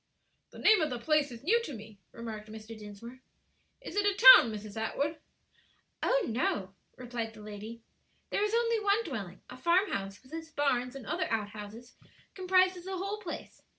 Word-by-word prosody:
"The - - -14
name 435 -4 +5
of 310 - +1
the 245 - -3
place 300 +3 +1
is 235 0 -10
new 455 +9 +3
to 295 - -6
me," 210 -1 -12
remarked 220 -2 -8
Mr. 220 +1 -9
Dinsmore. 215 +4 -11 0.6
"Is - - -8
it 410 - +2
a 400 - +2 0.2
town, 235 - +3
Mrs. 210 -1 -8
Atwood?" 285 +8 -2 0.8
"Oh, - - +2
no," 205 -5 -1 0.2
replied 235 -3 -5
the 215 - -12
lady, 215 +2 -9 0.5
"there 405 - +1
is 420 +2 +1
only 465 -1 +2
one 415 +2 +2
dwelling; 200 - -6
a 250 - -11
farmhouse 255 - 0
with 265 +4 -18
its 325 0 -6
barns 270 -4 0
and 270 -4 -8
other - - -2
out 215 -2 -1
houses 220 +4 -10 0.4
comprises 370 -1 +2
the 380 0 -4
whole 395 +3 -3
place. 365 -6 -8
250 Hz, 180 wpm, -30 LUFS, -, 0.8 s, name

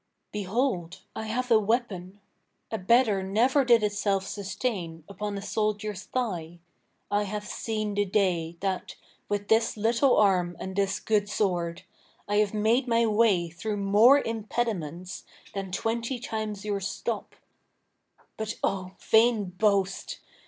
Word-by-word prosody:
Behold, 195 -4 -1
I 220 - -4
have 250 +3 -2
a 225 - +7
weapon; 205 -4 -2 0.5
A 220 - -2
better 215 0 +3
never 235 +9 +3
did 235 -3 +5
itself 205 -2 0
sustain 195 -5 -4
Upon 200 +1 -4
a 200 - -6
soldier's 210 -2 -2
thigh: 175 -10 -3 0.5
I 205 - +2
have 210 +1 -4
seen 215 -1 -3
the 205 0 +2
day, 180 -4 0
That, 190 -2 -2 0.3
with 205 0 -1
this 225 0 +2
little 235 +5 +3
arm 180 -4 +3
and 190 0 -5
this 195 0 0
good 205 -2 +1
sword, 175 -5 -1 0.4
I 205 0 +1
have 210 -1 +3
made 220 +5 +2
my 230 -1 +3
way 210 -6 +3
through 205 +5 -3
more 210 +8 +6
impediments 205 - -3 0.3
Than 195 -2 -4
twenty 230 +6 -1
times 215 -3 -4
your 205 -1 -1
stop: 200 +3 -4 1.0
but, 220 +1 -3
O 185 -1 -1
vain 220 -4 +3
boast! 195 0 0
205 Hz, 135 wpm, -27 LUFS, 190-225 Hz, 1.0 s, a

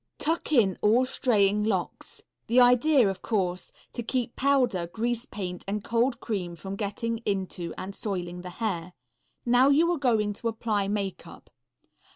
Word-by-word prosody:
Tuck 325 0 -1
in 210 - +3
all 230 +5 +4
straying 210 -6 +2
locks. 195 -5 -3 0.2
The 240 +2 +4
idea 250 +4 +5
is, 195 - -1
of - - -22
course, 185 -5 -2 0.2
to 240 - -4
keep 235 0 -2
powder, 250 -10 +2
grease 235 +6 -2
paint 180 -3 -5
and 205 +1 -2
cold 235 +3 +1
cream 185 -8 -3
from 190 +4 -6
getting 220 +3 -3
into 190 -5 -3
and 190 +2 -6
soiling 180 -4 -4
the 180 - -7
hair. 180 -3 -3 0.5
Now 245 +3 +5
you 320 +5 +4
are 345 - -1
going 220 -6 +1
to 230 - -5
apply 215 -3 -1
makeup. 200 -2 -5
215 Hz, 160 wpm, -27 LUFS, 190-245 Hz, 0.5 s, idea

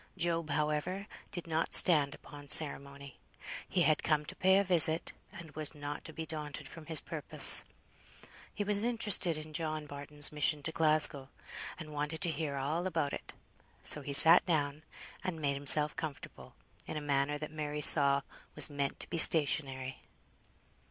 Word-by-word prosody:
Job, 170 -2 -4
however, 150 +6 -5 0.3
did 175 -4 -10
not 165 0 -2
stand 150 -5 +3
upon 145 0 -17
ceremony. 140 -2 +1 0.5
He 175 - -2
had 155 -2 -1
come 150 -2 -3
to - - -10
pay 190 +1 0
a 200 - -1
visit, 170 -3 +3 0.2
and 170 -2 -15
was 155 +1 -3
not 145 0 -10
to 160 - -11
be 160 +1 -10
daunted 150 -2 -10
from 160 +1 -16
his 160 -2 0
purpose. - - -1 0.9
He 205 - -7
was 205 0 0
interested 210 -8 +1
in 155 0 -13
John 155 -1 -6
Barton's 145 +1 -7
mission 150 0 -2
to 160 - -5
Glasgow, 155 -4 +1 0.5
and 155 -2 -13
wanted 150 +2 -7
to 175 -4 -1
hear 150 -2 -7
all 155 +7 -5
about 160 -5 -5
it; - - -11 0.5
so 150 - +3
he 140 - -10
sat 160 +4 +11
down, 150 -3 -4 0.4
and 185 -4 -7
made 140 -2 -4
himself 145 +2 +1
comfortable, 155 -5 -11 0.3
in 155 - -8
a - - -5
manner 145 0 -4
that 155 +1 -11
Mary 150 -1 -8
saw 140 -2 +4 0.3
was - - +4
meant 140 -1 -6
to - - -3
be 170 - -4
stationary. 135 -5 +1
150 Hz, 165 wpm, -28 LUFS, 145-165 Hz, 0.9 s, sat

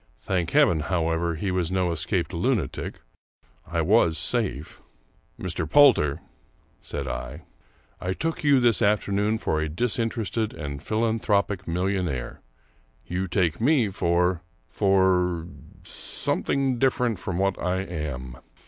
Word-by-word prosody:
Thank 90 -3 -1
Heaven, 140 - +4
however, 80 +1 0
he 95 +4 -2
was 90 -2 -1
no 90 -2 +1
escaped 85 0 -1
luna 100 +3 +1
tic. - - -7 0.7
I 85 -1 -1
was 85 -3 +3
safe! 80 - -1 0.3
" - - -37
Mr. 85 -3 -3
Poulter," 80 - +5 0.6
said - - -5
I, - - -5 0.3
" - - -35
I 90 +1 -1
took 165 - -3
you 145 -2 +5
this 120 -2 +3
afternoon 105 0 +1
for 80 -7 -1
a 80 - -2
disinterested 115 +3 -1
and 70 -1 -6
philanthropic 105 -4 0
millionaire; 85 -7 -2 0.6
you 95 +2 -2
take 90 0 0
me 125 -4 +3
for 90 -1 +1
— - - -39
for 95 -4 +2 0.2
— - - -21
something 135 -3 -2
different 125 -5 +1
from 90 -1 -4
what 95 0 0
I 90 +1 0
am. 70 -8 -5
95 Hz, 135 wpm, -25 LUFS, 85-110 Hz, 0.7 s, Poulter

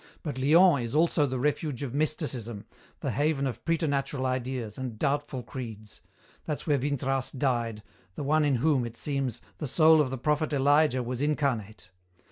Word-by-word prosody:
But 145 -5 -4
Lyons 155 0 +5
is 115 +4 -4
also 155 -2 +3
the 130 0 -3
refuge 145 0 -1
of 130 -3 -4
mysticism, 135 -8 -2 0.4
the - - -1
haven 145 -1 +1
of 130 -4 -4
preternatural 140 -5 0
ideas 130 -4 -2
and 125 -4 -5
doubtful 140 -1 -1
creeds. 110 -6 -8 0.4
That's 150 - -3
where 145 -3 +2
Vintras 135 -1 -1
died, 120 -5 -1 0.3
the - - -4
one 155 +2 +2
in 145 -2 +2
whom, 135 +1 +2
it 115 -1 -7
seems, 135 -5 -2 0.2
the 150 - -3
soul 155 +3 +6
of 140 - 0
the 130 - -4
prophet 150 +4 0
Elijah 145 -1 +3
was 125 +1 -4
incarnate. 125 -10 -1
135 Hz, 165 wpm, -28 LUFS, 125-150 Hz, 0.4 s, soul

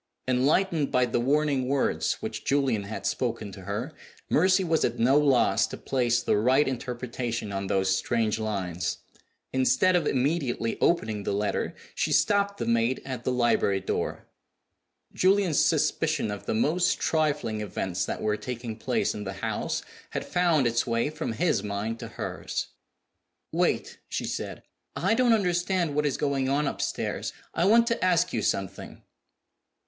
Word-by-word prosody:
Enlightened 145 +5 +2
by 125 0 +3
the 120 0 -1
warning 140 0 +1
words 140 0 +1
which - - -4
Julian 135 -7 +1
had 110 - -6
spoken 115 -4 -2
to 95 - -10
her, 110 - -4 0.4
Mercy 185 +4 +4
was 165 -3 +1
at - - 0
no 130 +4 +4
loss 140 -4 +3
to - - -7
place 120 -2 0
the - - +2
right 130 +7 +3
interpretation 120 -3 -3
on 100 0 -3
those 95 0 +2
strange 110 +2 0
lines. 95 -5 -2 0.6
Instead 130 +8 +3
of 165 -4 +2
immediately 130 -4 0
opening 110 -11 +1
the - - -2
letter, 105 +1 -1 0.2
she - - -1
stopped 200 0 +2
the - - -3
maid 115 +2 +1
at 130 -3 -5
the 130 - +1
library 120 -5 +2
door. 95 - -3 0.9
Julian's 190 -4 +3
suspicion 155 -3 +1
of 100 - -7
the - - 0
most 170 +10 +2
trifling 150 -9 0
events 95 -3 -2
that - - -4
were 105 0 +1
taking 120 -2 -6
place 125 +2 0
in 105 - -5
the 95 -1 -5
house 95 - -3 0.3
had - - -4
found 170 -6 +2
its 115 +1 +1
way 115 +5 0
from 155 -6 -4
his 170 +9 +1
mind 105 +3 -3
to - - -6
hers. - - -4 0.8
"Wait!" - - 0
she - - -2
said. - - -5 0.3
"I 190 +5 +1
don't 245 +1 +3
understand 180 -5 +1
what 150 +1 +1
is 140 - -1
going 140 -2 0
on 145 +2 +1
upstairs; - - -2 0.2
I 170 - +1
want 230 +4 +6
to 235 -4 -1
ask 180 -1 +2
you 115 - 0
something." 95 -1 -3
130 Hz, 160 wpm, -27 LUFS, 110-155 Hz, 0.9 s, want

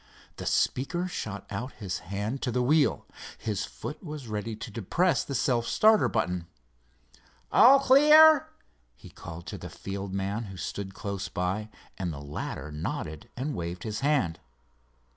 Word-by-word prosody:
The - - -5
speaker 175 +8 0
shot 105 - -5
out 125 +3 -4
his 95 -4 -4
hand 100 +8 -4
to 125 - -1
the 125 +1 +1
wheel. 145 +3 +3 0.3
His 105 -3 -2
foot 150 - -8
was 150 -6 -7
ready 110 +1 -3
to 110 - -8
depress 130 - +1
the 140 - -5
self 120 -2 +1
starter 215 0 +4
button. 90 -1 -1 1.0
"All 270 +3 +8
clear?" 300 +3 +7 0.5
he - - -14
called 85 +1 -9
to 85 - -6
the - - -7
field 100 0 -6
man 100 +4 -2
who 95 -2 -9
stood 95 +1 -5
close 100 -3 -4
by, 95 +4 -2 0.3
and 90 -3 -2
the 70 - -7
latter 75 +1 -6
nodded 75 0 -5
and 140 +4 -2
waved 85 -2 -5
his 110 -2 -3
hand. 135 - +1
110 Hz, 155 wpm, -28 LUFS, 95-145 Hz, 1.0 s, All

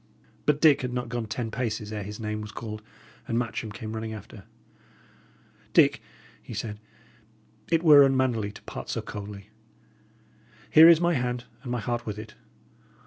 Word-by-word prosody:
But 150 -1 +3
Dick 145 -3 +5
had 125 -1 -3
not 125 -1 -3
gone 120 -2 -3
ten 115 0 -4
paces 110 -3 -3
ere 105 - -3
his 105 +1 -7
name 105 -1 -3
was 105 0 -7
called, 110 -1 -7 0.5
and 115 - -1
Matcham 115 -2 -3
came 110 +1 -7
running 110 0 -4
after. 105 - -11 1.3
"Dick," - - +5 0.4
he 115 - -9
said, 105 0 -5 0.9
"it 165 0 +2
were 150 -3 +9
unmannerly 130 -6 +2
to - - -13
part - - -8
so - - -2
coldly. 100 -1 -8 1.2
Here 160 +2 +9
is 165 -2 +7
my 175 0 +2
hand, 125 -3 -1 0.2
and 125 - -6
my 125 - -1
heart 120 0 -3
with 105 -1 -4
it. 110 0 -9
115 Hz, 165 wpm, -27 LUFS, 105-130 Hz, 1.3 s, were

